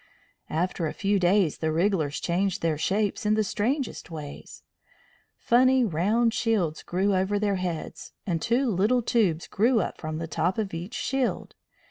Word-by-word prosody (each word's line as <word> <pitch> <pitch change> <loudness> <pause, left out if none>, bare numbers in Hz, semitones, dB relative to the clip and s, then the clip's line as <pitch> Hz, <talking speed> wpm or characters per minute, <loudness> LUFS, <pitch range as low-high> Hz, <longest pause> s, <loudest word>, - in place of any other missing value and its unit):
After 170 +1 -1
a - - -4
few 200 0 +1
days 180 -2 +2
the 160 -1 0
wrigglers 165 -3 0
changed 185 +1 -1
their 165 -2 +2
shapes 205 +6 0
in 210 0 +2
the 215 - +2
strangest 245 +6 -2
ways. 150 -3 -9 0.7
Funny 255 +1 +4
round 215 +6 +1
shields 210 -10 0
grew 195 +3 0
over 190 +2 +1
their 200 -1 0
heads, 180 -3 -5
and 170 -4 -1
two 250 +4 +1
little 215 +6 +2
tubes 200 -9 +1
grew 230 +3 +2
up - - -3
from 155 -1 -4
the 165 - -3
top 170 +3 -1
of 210 -4 -2
each 175 +8 -6
shield. 260 0 -2
195 Hz, 160 wpm, -26 LUFS, 165-225 Hz, 0.7 s, Funny